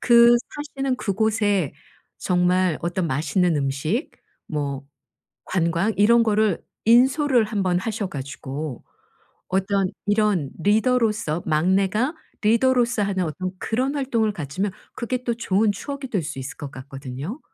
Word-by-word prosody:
그 235 0 +7 0.4
사시는 270 -2 0
그곳에 205 - +1 0.5
정말 180 -1 +2
어떤 175 +1 -1
맛있는 155 +5 +1
음식 145 - -1 0.4
뭐 140 -2 -3 0.6
관광 170 +4 +1
이런 230 +3 +5
거를 215 -3 +2 0.2
인솔를 255 +1 +4
1 210 -2 -2
번 180 -1 +1
하셔 210 +1 -3
가지고 140 -1 -6 0.7
어떤 195 0 +1 0.2
이런 205 -8 +2
리더로서 215 -6 +2
막내가 190 - +2 0.3
리더로서 235 +1 +3
하는 195 -2 0
어떤 180 +4 -3
그런 255 +8 -1
활동을 235 -6 0
가지면 185 +3 -3 0.2
그게 250 +1 -3
또 240 - +1
좋은 215 -2 +1
추억이 280 +6 -6
될 195 -7 0
수 150 -2 -6
있을 135 +1 -6
것 145 - -7
같거든요. 135 - -7
200 Hz, 260 characters per minute, -23 LUFS, 165-230 Hz, 0.7 s, 그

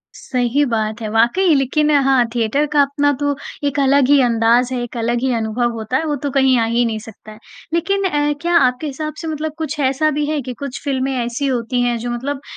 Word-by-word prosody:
सही 250 +2 0
बात 220 0 -2
है, 220 - -3
वाक़ई 240 - +3
लेकिन 285 +3 +1 0.2
हाँ 265 -3 +4
थिएटर 235 +6 +1
का 290 - +5
अपना 285 +1 +1
तो 285 -1 0 0.3
एक 285 0 -2
अलग 275 -1 +3
ही 285 -1 +6
अंदाज़ 240 +1 +2
है, 250 - -2
एक 240 0 -7
अलग 235 +1 0
ही 260 0 0
अनुभव 230 +2 -1
होता 225 +3 -2
है, 320 - -2
वो 300 -2 -1
तो 285 - 0
कहीं 265 -2 +3
आ 225 - +2
ही 240 +1 +3
नहीं 220 -2 -2
सकता 215 0 -13
है। 215 - -13 0.4
लेकिन 395 +4 0
अ, 295 -4 +1
क्या 345 0 0
आपके 255 +1 +1
हिसाब 305 +2 -5
से 325 - -5
मतलब 310 -1 -3
कुछ 310 -2 -4
ऐसा 275 +3 +1
भी 295 0 -1
है 300 0 -1
कि 255 0 -6
कुछ 280 -2 -6
फिल्में 270 -1 -1
ऐसी 240 +4 -2
होती 245 -1 -1
हैं, 240 -1 +1
जो 240 +2 -4
मतलब 270 +3 -4
265 Hz, 230 wpm, -18 LUFS, 240-290 Hz, 0.4 s, ही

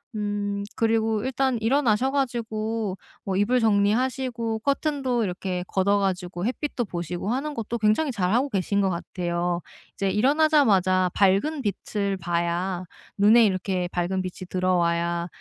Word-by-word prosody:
음 205 -1 -2
그리고 225 -1 +1
일단 260 -1 0
일어나셔 245 0 +2
가지고 225 -6 -2 0.3
뭐 190 -1 -2
이불 230 +6 +2
정리하시고 230 +2 +1
커튼도 275 -2 0
이렇게 180 -1 -3
걷어 200 +1 +2
가지고 180 -2 -2
햇빛도 255 -1 -2
보시고 175 +1 -4
하는 285 +5 -2
것도 230 -2 -3
굉장히 225 +7 +2
잘하고 230 +6 +1
계신 200 -1 0
것 195 - +2
같아요. 175 0 -2 0.3
이제 195 - -1
일어나자마자 210 - +3
밝은 205 +11 +2
빛을 200 -2 -2
봐야, 175 +1 -1 0.3
눈에 220 +3 +6
이렇게 185 -2 -1
밝은 180 +2 -1
빛이 185 0 -7
들어와야 170 -2 0
205 Hz, 315 characters per minute, -25 LUFS, 185-240 Hz, 0.3 s, 눈에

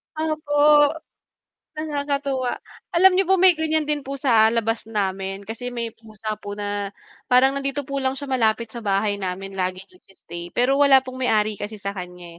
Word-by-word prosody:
Opo, 300 -1 +3 0.9
nakakatuwa. 285 -4 -2 0.4
Alam 375 +2 +7
n'yo 385 +1 +3
po 385 - +5
may 370 0 +6
ganyan 315 -1 +1
din 295 -1 0
po 275 - -4
sa 230 -5 +4
labas 225 -1 -1
namin. 195 -2 -3
Kasi 230 +4 -6
may 235 -1 -3
pusa 215 -1 -7
po 205 0 -6
na 205 -1 -3 0.4
parang 255 +2 +5
nandito 275 +1 -2
po 275 +1 -4
lang 260 0 0
siya 280 0 -6
malapit 230 -3 +1
sa 235 - -6
bahay 200 +1 0
namin 190 +1 -4
laging 185 0 -2
nag-stay. 175 - -11
Pero 265 +3 +2
wala 275 -2 +6
pong 255 0 -8
may-ari 215 -2 +1
kasi 215 +1 -5
sa 200 0 -3
kanya, 180 -2 -9
235 Hz, 170 wpm, -23 LUFS, 205-285 Hz, 0.9 s, Alam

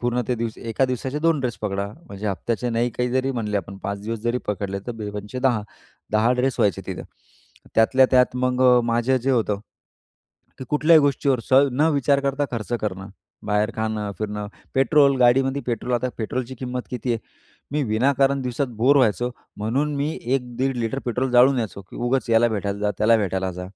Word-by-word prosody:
पूर्ण 120 0 0
ते 125 - +2 0.3
एका 115 +4 +1
दिवसाचे 130 +2 -2
2 165 0 +2
ड्रेस 125 -3 -2
पकडा 100 -1 -2 0.2
म्हणजे 100 +1 -6
हप्त्याचे 115 +5 -2
नाही, 120 +1 0
काही 125 +2 -1
जरी 130 +1 0
म्हणले 105 -4 -2
आपण 100 0 -5
5 100 0 -3
दिवस 115 +1 -3
जरी 120 +2 0
पकडले 100 -1 -2
तर 120 - -3
बे 110 -2 -6
पंचे 105 +4 -6
10. 125 -5 +2 0.5
10 110 +3 +3
ड्रेस 125 +1 0
व्हायचे 100 -5 +1
तिथं. - - -5 0.7
त्यातल्या 130 +4 +5
त्यात 125 -1 +3
मग 125 0 0
अ, 125 -1 +6
माझे 120 +3 +1
जे 130 +2 -1
होतं 110 -5 +1 1.0
की 130 - -6
कुठल्याही 155 +2 +5
गोष्टीवर 140 -2 +1
स - - -4 0.2
न 150 +5 +3
विचार 140 0 +2
करता 140 +1 0
खर्च 115 0 -4
करणं, 95 -2 -4 0.4
बाहेर 105 +2 +1
खाणं, 110 -2 -2
फिरणं, 105 -1 -4 0.7
गाडीमध्ये 135 +3 +3
पेट्रोल. 120 +1 -2
आता 120 +1 0
पेट्रोलची 125 +3 -3
किंमत 125 -1 -3
किती 125 0 -2
आहे? - - -3 0.5
मी 150 0 +1
विनाकारण 135 +4 +2
दिवसात 125 +2 -1
बोरे 135 +6 +4
व्हायचो 120 0 +2 0.3
म्हणून 135 +8 -1
मी 145 +2 0
1 125 0 -2
दीड 135 0 0
लिटर 120 +2 -2
पेट्रोल 125 +2 -1
जाळून 125 +2 +6
यायचो 110 -4 -4
की - - -10
उगाच 125 +1 -1
याला 115 +1 +5
भेटायला 100 -2 -2
जा, 105 0 +1
त्याला 115 +2 +5
भेटायला 95 -3 -1
जा. 90 +1 -7
120 Hz, 185 wpm, -23 LUFS, 110-130 Hz, 1.0 s, अ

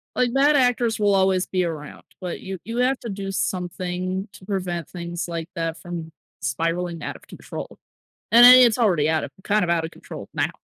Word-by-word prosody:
Like, 245 -1 +1
bad 285 +2 +4
actors 245 -4 +2
will 205 -1 +3
always 190 -1 +2
be 185 -1 0
around, 155 -3 -6 0.2
but 180 -2 -5
you 190 0 -6
you 230 +4 -5
have 255 +2 +2
to 235 - -6
do 195 0 -4
something 185 +1 -3
to 185 - -14
prevent 180 -5 -3
things 175 -1 -5
like 165 -1 -5
that 165 -1 -2
from 170 -2 -7 0.3
spiraling 165 +5 -2
out - - -4
of - - -15
control, - - -8 0.5
and 235 +1 +8
then 250 +1 +11
it's 240 -3 +5
already 175 -11 +2
out 160 -1 +1
of - - -6
kind 210 -1 +2
of 170 - -1
out 165 -1 +1
of 160 - -8
control - - -10
now. - - -1
185 Hz, 200 wpm, -23 LUFS, 170-220 Hz, 0.5 s, then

